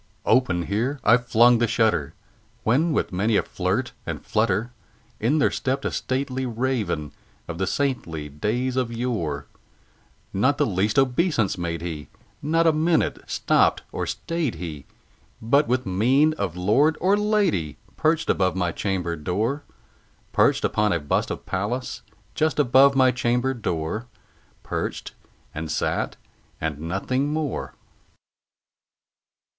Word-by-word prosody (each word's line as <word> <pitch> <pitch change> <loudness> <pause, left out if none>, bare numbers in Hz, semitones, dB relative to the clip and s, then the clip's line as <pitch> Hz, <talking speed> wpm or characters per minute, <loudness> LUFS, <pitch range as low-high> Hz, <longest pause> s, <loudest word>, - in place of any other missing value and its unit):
Open 95 -9 +3
here 120 +10 -1
I 115 +3 +6
flung 120 0 +4
the 120 - +2
shutter, 110 - +1 0.5
when, 145 +10 +2
with 150 - 0
many 105 +4 +2
a - - +2
flirt - - -2
and - - -6
flutter, 110 +2 0 0.5
In 125 +8 +2
there 145 - +3
stepped 135 +1 -2
a - - 0
stately 130 0 -2
Raven 115 - -2 0.4
of 85 - -6
the 95 - 0
saintly 90 - -2
days 110 - -2
of 125 -2 0
yore; 105 - -2 0.9
Not 130 +9 +2
the 145 - +3
least 105 0 0
obeisance 135 - +2
made 85 -2 -4
he: 80 -4 -5 0.3
not 165 +3 +2
an 160 0 +3
instant 165 -2 +1
stopped - - +2
or - - -3
stayed 165 - -2
he; 80 -4 -7 0.5
But, 140 +7 +3
with 125 +1 0
mien 130 +11 +3
of 100 - -3
lord 135 - +3
or 190 +3 +3
lady, 205 - +1 0.2
perched 155 +1 +1
above 95 -1 +1
my 90 -2 0
chamber 90 -3 -2
door 105 - -1 0.7
Perched - - +3
upon 105 0 +1
a 85 - +1
bust 75 -1 0
of - - -5
Pallas 105 +7 -3 0.3
just 155 0 0
above 140 0 +5
my 130 -1 +5
chamber 125 +1 0
door 105 0 -3 0.6
Perched, - - -4 0.4
and 80 +1 -5
sat, - - -1 0.4
and 75 -2 -3
nothing 100 - -1
more. 155 -2 -3
115 Hz, 135 wpm, -24 LUFS, 90-135 Hz, 0.9 s, I